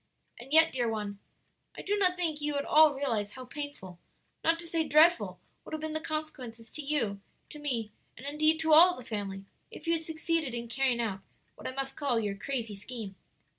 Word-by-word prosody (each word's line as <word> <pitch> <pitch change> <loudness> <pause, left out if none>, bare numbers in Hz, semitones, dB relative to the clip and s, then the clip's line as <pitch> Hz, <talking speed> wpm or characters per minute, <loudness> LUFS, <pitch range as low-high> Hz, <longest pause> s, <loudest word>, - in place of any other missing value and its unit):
"And 260 +3 -11
yet, 320 +1 +6
dear 245 -3 0
one, 210 -2 -4 0.6
I - - -6
do 410 - +1
not 370 -3 +3
think 325 -4 -1
you 295 0 -1
at 280 - -1
all 310 -2 +6
realize 230 -7 -1
how 255 -1 -9
painful 250 - -7 0.4
not 330 0 +4
to 340 0 -9
say 330 -1 +1
dreadful 320 +3 +4 0.2
would - - -10
have 310 - -6
been 315 0 -3
the 315 - 0
consequences 255 -8 -5
to 305 - -5
you, 245 -9 -1 0.3
to 300 - -9
me, 240 -7 -2 0.3
and, 255 - -10
indeed, 310 +2 +2
to 320 -1 +3
all 355 +4 +8
the 255 - -9
family, 200 -3 -5 0.2
if - - -11
you 335 - +2
had 330 - 0
succeeded 320 -4 -1
in 235 0 -5
carrying 245 0 +1
out 205 -5 -2 0.3
what - - -8
I - - -3
must 270 0 -4
call 270 -6 +1
your 205 -2 -1
crazy 225 0 -4
scheme." 210 0 -7
275 Hz, 210 wpm, -30 LUFS, 230-315 Hz, 0.6 s, all